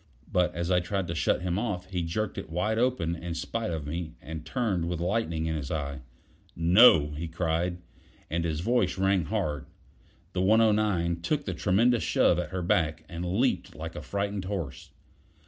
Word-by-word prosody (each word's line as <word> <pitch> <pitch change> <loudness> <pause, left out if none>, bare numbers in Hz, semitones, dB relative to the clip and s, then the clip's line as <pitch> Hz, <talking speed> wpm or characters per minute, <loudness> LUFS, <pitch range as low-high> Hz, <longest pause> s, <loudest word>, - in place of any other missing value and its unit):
But 90 -1 +2
as 85 +1 -2
I 90 - +5
tried 95 +2 -2
to - - -1
shut 85 +2 +1
him 90 +1 0
off, 105 -6 -2
he 90 -2 -1
jerked 85 +6 -2
it - - -8
wide 105 +7 0
open 120 -10 +1
in 85 0 -5
spite 110 +7 -3
of 80 -3 -3
me, 80 +2 -4
and 80 +3 -7
turned 90 -1 -1
with 85 -2 -2
lightning 85 -3 -1
in 80 0 -1
his 70 -4 -4
eye. 70 -3 -3 0.5
"No!" 85 -3 +6
he 80 +3 -4
cried, 85 +1 -1 0.5
and 85 +2 -1
his 80 -1 -1
voice 110 -2 +1
rang 95 -2 +2
hard. 85 -10 -2 0.7
The 90 - 0
109 105 -5 +3
took 145 - -1
the - - -2
tremendous 115 +5 +3
shove - - +3
at 90 - -3
her 90 0 -3
back, 80 -2 +1
and 85 0 -5 0.2
leaped 130 0 0
like - - -6
a - - -5
frightened 100 -1 -3
horse. 85 -10 -5
90 Hz, 180 wpm, -28 LUFS, 80-100 Hz, 0.7 s, No